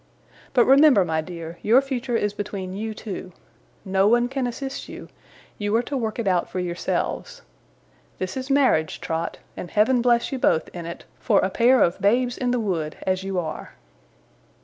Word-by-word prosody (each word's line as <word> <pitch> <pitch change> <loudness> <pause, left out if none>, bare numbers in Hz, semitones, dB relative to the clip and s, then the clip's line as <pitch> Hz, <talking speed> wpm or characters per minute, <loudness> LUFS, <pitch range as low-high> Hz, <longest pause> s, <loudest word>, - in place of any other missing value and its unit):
But 245 - +6
remember, 270 -7 +6
my 160 -1 0
dear, 170 0 -8
your 230 +5 +5
future 265 -3 -3
is 205 -2 0
between 195 -2 -5
you 215 +2 -4
two. 190 -4 -7 0.5
No 190 +1 +2
one 240 +2 +3
can 265 -1 -1
assist 270 +3 -6
you; - - -9 0.5
you 205 +1 0
are 235 - +2
to 285 - -5
work 225 -4 -2
it 230 -4 -2
out 180 -2 +1
for 185 - -4
yourselves. 180 - -3 0.7
This 185 0 -4
is 260 +1 -5
marriage, 260 - +2
Trot; 165 +1 -3 0.2
and 175 - -7
Heaven 235 +4 +3
bless 235 -1 +2
you 265 - -3
both, 160 - +2
in 170 -2 -7
it, 170 - -8
for 215 -5 +2
a 190 - 0
pair 245 +4 +4
of 175 +3 0
babes 240 +5 +2
in 250 - -2
the 245 0 +1
wood 170 -8 -2
as 185 0 0
you 195 -1 -3
are! 160 -3 -5
210 Hz, 185 wpm, -23 LUFS, 185-245 Hz, 0.7 s, But